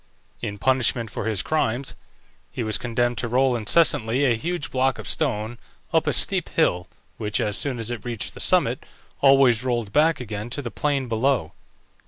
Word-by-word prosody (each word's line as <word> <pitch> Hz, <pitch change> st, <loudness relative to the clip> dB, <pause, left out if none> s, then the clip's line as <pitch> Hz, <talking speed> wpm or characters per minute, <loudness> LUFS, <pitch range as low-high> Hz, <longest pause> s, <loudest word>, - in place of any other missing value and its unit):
In 105 Hz, -3 st, -4 dB
punishment 120 Hz, -1 st, +1 dB
for -, -, -4 dB
his 110 Hz, -4 st, 0 dB
crimes 135 Hz, -4 st, -1 dB, 0.6 s
he 120 Hz, -, -4 dB
was 110 Hz, -1 st, +1 dB
condemned 120 Hz, -1 st, -1 dB
to 120 Hz, -, -2 dB
roll 130 Hz, +2 st, +2 dB
incessantly 120 Hz, +1 st, +2 dB
a 125 Hz, -, +4 dB
huge 165 Hz, +6 st, -3 dB
block 130 Hz, 0 st, +1 dB
of -, -, -8 dB
stone 120 Hz, -5 st, -2 dB, 0.3 s
up -, -, +2 dB
a -, -, +2 dB
steep -, -, +1 dB
hill, 90 Hz, 0 st, +1 dB, 0.3 s
which, 105 Hz, -1 st, -1 dB
as 105 Hz, -1 st, 0 dB
soon 135 Hz, -4 st, 0 dB
as 115 Hz, 0 st, -4 dB
it 115 Hz, -4 st, -5 dB
reached 120 Hz, -3 st, -4 dB
the -, -, -11 dB
summit, -, -, +2 dB, 0.4 s
always 135 Hz, -4 st, +5 dB
rolled 120 Hz, -5 st, -2 dB
back 155 Hz, +1 st, +3 dB
again 110 Hz, -2 st, -5 dB
to 145 Hz, +4 st, -4 dB
the 120 Hz, -, -5 dB
plain 140 Hz, +1 st, -1 dB
below. 115 Hz, -, 0 dB
120 Hz, 180 wpm, -23 LUFS, 110-135 Hz, 0.6 s, always